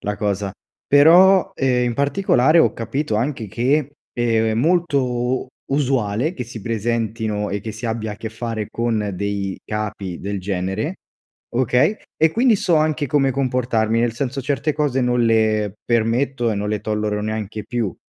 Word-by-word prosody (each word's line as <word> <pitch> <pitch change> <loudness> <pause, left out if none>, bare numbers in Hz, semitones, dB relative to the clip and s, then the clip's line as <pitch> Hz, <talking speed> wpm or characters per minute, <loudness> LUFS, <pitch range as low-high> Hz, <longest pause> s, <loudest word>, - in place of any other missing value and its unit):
la 105 0 -2
cosa. 100 -2 -2 0.3
Però, 175 +6 +6
ehm, 125 -2 +1
in 120 - -1
particolare, 145 +1 +3
ho - - +4
capito 115 +1 -2
anche 120 0 -1
che 135 +7 0 0.2
è 115 -2 +1
molto 160 +4 +2
u 125 +1 -1 0.2
usuale 135 - 0
che 125 - -5
si 115 -1 -9
presentino 110 -1 -2
e 100 0 -3
che 110 0 -6
si 115 +3 -6
abbia 110 -1 -3
a - - -9
che 110 +1 -5
fare 110 -1 -4
con 110 -3 -1
dei 100 0 -3
capi 105 -4 -4
del 100 0 -3
genere, 95 - -3 0.6
okay, 130 - +2 0.2
e 160 0 +4
quindi 235 0 +4
so 175 -3 +2
anche 155 -1 +1
come 135 0 +2
comportarmi, 120 -4 0
nel 120 -1 +1
senso, 135 +2 -3
certe 145 +2 -1
cose 145 -4 0
non 125 -1 +2
le 110 -2 +2
permetto 120 +2 +1
e 110 - -1
non 105 +1 -2
le 105 -2 -1
tollero 105 -1 -1
neanche 110 0 -4
più, 115 -7 -2
115 Hz, 165 wpm, -21 LUFS, 105-135 Hz, 0.6 s, Però